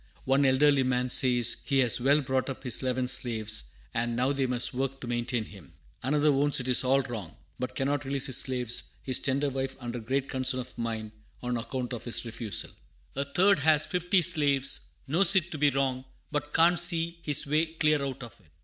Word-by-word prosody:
One 135 +1 +3
elderly 140 +1 +4
man 125 -1 0
says 120 -3 +3
he 140 - 0
has 125 -3 +3
well 140 +4 +4
brought 130 0 -1
up 135 - -7
his 125 -4 +1
eleven 130 -1 -1
slaves, 110 - +1 0.3
and 120 +1 -1
"now 125 +3 +1
they 135 -1 0
must 125 +1 -1
work 135 +1 -3
to - - -8
maintain 120 -1 -2
him." 95 -10 -15 0.3
Another 145 +3 +2
owns 145 0 +2
it 125 - -5
is 125 0 +3
all 135 +2 +3
wrong, 110 -10 -7 0.2
but 125 0 -4
"cannot 140 +1 -1
release 135 -1 -1
his 130 -3 0
slaves; 125 -3 -1 0.2
his 130 -2 0
tender 140 +1 0
wife 135 0 -3
under 120 -1 -5
great 130 +4 -2
concern 130 -1 -1
of 125 - -8
mind" 110 -2 -4 0.3
on 125 0 -2
account 125 +2 -4
of 120 -1 -6
his 120 0 -2
refusal. 115 -2 -4 0.4
A 140 +1 -1
third 180 +6 +3
has 155 +1 +3
fifty 180 0 +1
slaves; 145 -6 +1 0.2
knows 175 +6 +6
it 175 -2 +2
to 155 - -5
be 145 0 +4
wrong, 135 -2 -1 0.3
but 145 0 -3
can't 170 +2 +4
see 170 -1 0
his 150 -5 +1
way 155 +3 +1
clear 155 -2 +1
out 135 -2 -5
of 120 - -10
it. 80 - -26
130 Hz, 205 wpm, -28 LUFS, 125-145 Hz, 0.4 s, knows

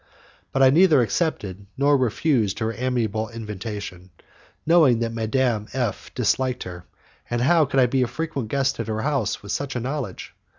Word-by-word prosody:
But 135 - +2
I 130 - +7
neither 155 -4 +5
accepted 105 - -2
nor 140 +1 +4
refused 125 -4 +1
her 110 0 -2
amiable 115 -3 -1
invitation, 105 -4 -7 0.6
knowing 160 -7 +5
that 115 0 -2
Madame 115 -1 0
F 125 -5 -3
disliked 125 +2 0
her; 90 -1 -9 0.4
and 120 - -1
how 160 +4 +4
could 135 0 0
I 130 - +6
be 130 +2 +1
a 125 - +2
frequent 140 -1 -4
guest 135 +3 0
at - - -3
her 110 0 -2
house 140 -8 -1
with 100 - -6
such 140 +7 -3
a - - 0
knowledge! 125 -5 -5
125 Hz, 170 wpm, -23 LUFS, 110-135 Hz, 0.6 s, I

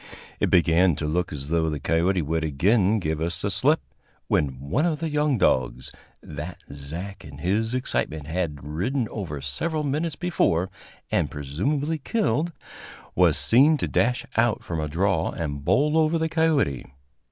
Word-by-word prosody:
It - - +1
began 85 0 +4
to 75 - -4
look 85 +3 -1
as 70 -1 -6
though 80 -1 +1
the 75 -2 -3
coyote 85 +5 +1
would 80 +2 -1
again 95 - +2
give 80 -5 -2
us 85 +1 0
the 100 - -1
slip, 140 - +2 0.5
when 65 -4 0
one 70 - -1
of 155 -3 -1
the 165 0 -2
young 150 -2 +1
dogs, 65 - +1 0.3
that 80 +2 -7 0.2
Zach 80 +8 -7
in - - -11
his 110 +6 0
excitement 80 - -1
had 80 -3 -3
ridden 95 - -1
over 80 -10 -5
several 155 - -2
minutes 150 +3 -1
before 95 - 0 0.4
and 75 - +1
presumably 135 - -2
killed, 175 - 0 0.6
was - - +4
seen 145 +7 +5
to - - -2
dash 125 +1 +1
out 115 -1 +2
from 85 -2 -4
a 75 - -1
draw 95 +6 +1
and 70 -3 -4
bowl 150 - +2
over 160 +1 +3
the 160 0 -1
coyote. 160 - +1
90 Hz, 165 wpm, -25 LUFS, -, 0.6 s, seen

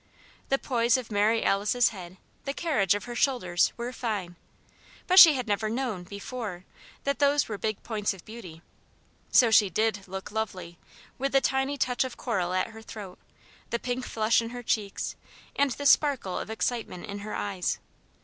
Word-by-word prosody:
The 270 - +3
poise 245 -1 +2
of 245 -3 -7
Mary 215 +2 +2
Alice's 210 +5 +3
head, 185 -3 -10 0.3
the 275 0 -3
carriage 215 - +2
of 205 - -4
her 240 - -7
shoulders, 240 -9 +2
were 240 +1 -4
fine. 205 -8 -3 0.7
But 370 +1 +7
she 320 -5 +11
had 250 -3 -3
never 210 +1 0
known, 225 -6 -3
before, 200 -1 -6 0.4
that 280 0 -1
those 285 0 +3
were 210 -3 -5
big 215 -2 -3
points 210 -3 -1
of 195 -3 -10
beauty. 180 -8 -10 0.7
So 235 -3 +6
she 210 -2 +6
did 215 +3 0
took 190 +1 -7
lovely, 185 -6 -4 0.4
with 275 +1 -1
the 270 - +6
tiny 270 +2 0
touch 250 -1 +1
of 260 -2 -6
coral 190 -8 -1
at 185 - 0
her 225 0 -11
throat, 205 -4 -9 0.5
the 235 - 0
pink 245 +1 -3
flush 220 +1 +2
in 230 - -5
her 245 0 -7
cheeks, 205 -3 -2 0.4
and 285 0 +3
the 285 +3 -5
sparkle 275 -10 +3
of - - -6
excitement 220 -4 -3
in 205 -1 -6
her 210 +1 -6
eyes. 195 -3 -2
220 Hz, 180 wpm, -27 LUFS, 200-250 Hz, 0.7 s, she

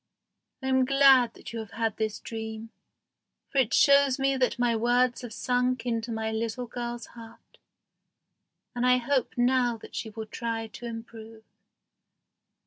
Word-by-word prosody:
I - - -2
am 260 0 +3
glad 265 -3 +5
that - - -10
you 230 - -4
have 220 -2 -8
had 225 -2 -1
this 215 -1 -2
dream, 220 0 -7 0.8
for 275 - +1
it 245 -3 +2
shows 280 -2 +5
me 270 0 +1
that 260 -1 0
my 240 -1 +2
words 245 +2 +2
have 245 -3 -8
sunk 250 +1 0
into 230 -1 -2
my 220 0 -2
little 230 +3 -3
girl's 240 -1 -5
heart, 230 -1 -15 1.1
and 245 -1 -2
I 250 0 +5
hope 255 +1 -1
now 245 -1 +2
that - - -13
she 220 - -4
will 220 +1 -7
try 225 0 -4
to 235 +2 -9
improve." 225 -1 -9
240 Hz, 155 wpm, -27 LUFS, 225-255 Hz, 1.1 s, glad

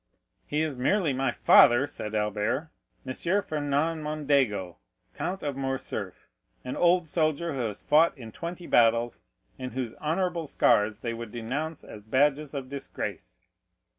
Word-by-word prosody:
"He 150 +1 0
is 150 -5 -3
merely 160 +4 +2
my 135 +1 0
father," 120 +3 +6
said 110 -6 -5
Albert—"M. 110 +6 -3 0.3
Fernand 150 +2 -1
Mondego, 140 - 0 0.4
Count 190 +2 -4
of 145 -2 -2
Morcerf, 130 -8 -4 0.4
an 125 - -4
old 175 -1 +3
soldier 155 +1 0
who 135 - -4
has 105 -1 -7
fought 160 +1 +4
in 115 -4 -9
twenty 170 +6 -6
battles 115 -2 +3 0.4
and 130 -2 -5
whose 125 -3 -3
honorable 170 +1 -1
scars 105 -5 +3
they 115 +1 -4
would 115 -1 -7
denounce 140 +7 -4
as 105 - -10
badges 145 +6 +1
of 135 -2 -4
disgrace." 135 - -6
135 Hz, 135 wpm, -27 LUFS, 115-155 Hz, 0.4 s, father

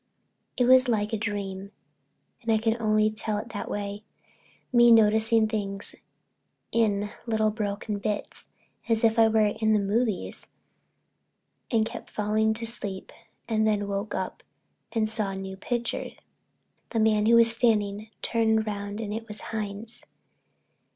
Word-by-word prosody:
It 245 - +3
was 255 +1 +6
like 215 -2 0
a - - +3
dream 200 -2 -4 0.7
and 230 -2 -1
I 220 - +4
can 225 +1 +1
only 215 -1 +2
tell 215 0 -2
it 220 +3 -6
that 205 - -5
way—me 205 +3 -1
noticing 220 0 +6
things 200 -2 -2 0.8
in 210 -3 +1 0.2
little 220 -1 +1
broken 210 -1 -3
bits, 205 0 -4 0.4
as 225 0 +2
if 225 0 +3
I 225 - +7
was 215 -1 +2
at - - -14
the 220 - 0
"movies" 210 +1 -1 1.2
and 225 -2 +2
kept - - -8
falling 215 +1 0
to 230 +1 -4
sleep, 205 -4 -3 0.4
and 220 -1 +1
then 205 -1 0
woke 200 +1 -3
up - - -4 0.5
and 220 -2 +1
saw 215 -2 -2
a 195 - -5
new 190 0 -6
picture. 235 +4 -3 0.8
The 230 - -1
man 215 -1 +3
who 235 - +6
was 230 -1 +6
standing 215 -3 +1
turned 220 -1 +2
round 205 0 -4
and 210 -2 -4
it 225 +1 -5
was 210 -1 -3
Hines. 215 +1 -4
215 Hz, 145 wpm, -26 LUFS, 205-225 Hz, 1.2 s, I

